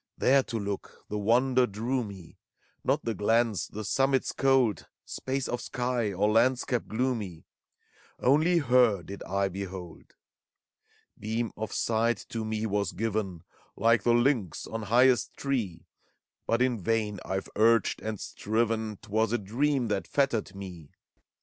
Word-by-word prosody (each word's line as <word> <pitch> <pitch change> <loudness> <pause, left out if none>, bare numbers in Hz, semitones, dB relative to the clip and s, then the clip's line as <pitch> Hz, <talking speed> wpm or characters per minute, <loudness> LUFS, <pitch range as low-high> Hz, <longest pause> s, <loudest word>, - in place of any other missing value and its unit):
159 130 - +3
There 135 -1 +6 0.2
to 100 - -1
look, 100 - -8
the 105 - -2
Wonder 125 +4 +3
drew 120 +5 -2
me: 95 -6 -11 0.4
Not - - 0
the 115 - 0
glens, 110 -2 +1
the 110 +1 -6
summits 135 +5 +1
cold, 135 -6 +2 0.2
Space 135 0 -3
of 120 - -3
sky 125 -4 -1
,or 100 +3 +1
landscape 120 +1 +2
gloomy, 110 -8 -2 0.4
— - - -31
Only 160 +6 +4
Her 125 - +3
did 100 +4 -8
I 100 +1 0
behold. 95 -3 -8 1.0
Beam 110 +2 -2
of 110 -1 -5
sight 115 +1 0
to 115 -1 -3
me 110 0 -2
was 100 -2 -1
given, 100 -5 -2 0.3
Like 115 -1 +3
the 120 +2 +3
lynx 120 - +1
on 115 - -5
highest 120 +3 +3
tree; 105 - -2 0.6
But 115 +2 +2
in 125 -5 0
vain 105 0 0
IVe 95 0 -3
urged 115 0 +3
and 110 -2 -4
striven, 110 0 -1
'T - - -13
was 110 +1 +1
a 120 - +2
dream 125 +5 0
that 100 -2 -1
fettered 120 -8 0
me. 90 -6 -9
110 Hz, 150 wpm, -28 LUFS, 100-125 Hz, 1.0 s, There